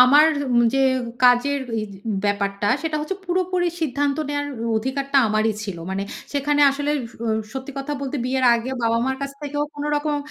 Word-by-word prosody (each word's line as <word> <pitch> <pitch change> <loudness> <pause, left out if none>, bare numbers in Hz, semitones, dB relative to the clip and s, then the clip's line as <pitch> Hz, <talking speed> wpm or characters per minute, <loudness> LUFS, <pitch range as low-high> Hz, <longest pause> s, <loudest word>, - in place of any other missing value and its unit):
আমার 285 +5 +8 0.3
উ - - +6
যে - - +2 0.4
কাজের 250 +3 +5 0.2
ওইজ 215 -2 -3 0.3
ব্যাপারটা 200 0 0 0.2
সেটা 315 -1 -1
হচ্ছে 305 +6 -3
পুরোপুরি 365 0 0
সিদ্ধান্ত 285 -2 0
নেওয়ার 290 0 -1 0.3
অধিকারটা 275 +4 -1
আমারই 215 +1 +2
ছিল, 195 -4 -5
মানে 195 +1 -2 0.3
সেখানে 290 +1 +1
আসলে 285 +1 -2 0.2
স - - -21 0.4
সত্যি 265 +1 -6
কথা 275 +2 -3
বলতে 280 +1 -3
বিয়ের 260 +1 0
আগে 235 +2 -2
বাবা-মার 230 +3 +1
কাছ 275 - -3
থেকেও 290 0 -2
কোনো 290 0 -4
রকম, 295 0 0
275 Hz, 165 wpm, -22 LUFS, 235-290 Hz, 0.4 s, আমার